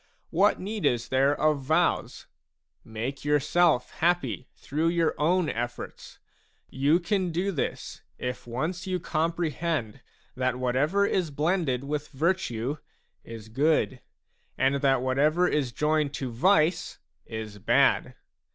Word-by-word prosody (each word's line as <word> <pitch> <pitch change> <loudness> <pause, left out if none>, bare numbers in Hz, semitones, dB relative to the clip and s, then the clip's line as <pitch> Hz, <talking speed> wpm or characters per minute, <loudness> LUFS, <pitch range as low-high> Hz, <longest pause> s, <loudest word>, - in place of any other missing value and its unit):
What 195 +5 +3
need 205 +2 -4
is 120 -1 +1
there 135 +2 +2
of 155 -2 +2
vows? 160 +6 0 0.6
Make 120 +5 -5
yourself 150 -1 +2
happy 160 - 0
through 155 +4 -2
your 170 -1 +2
own 175 +3 +2
efforts; 120 -1 -5 0.5
you 145 +6 +3
can 185 -1 -1
do 180 +4 -1
this, 155 - -4 0.2
if 125 -1 -5
once 165 - -3
you 185 -1 -1
comprehend 160 -7 -2 0.3
that 130 -1 0
whatever 140 +11 +1
is 185 -5 0
blended 150 -3 0
with 150 +1 -3
virtue 145 -4 -1 0.5
is 115 -2 -9
good, 135 +1 +1 0.6
and 135 +1 +2
that 135 -2 +3
whatever 150 +7 +2
is 140 -7 0
joined 150 +1 0
to 130 -3 -4
vice 165 - +2 0.3
is 110 -2 -6
bad. - - +2
150 Hz, 125 wpm, -27 LUFS, 130-170 Hz, 0.6 s, What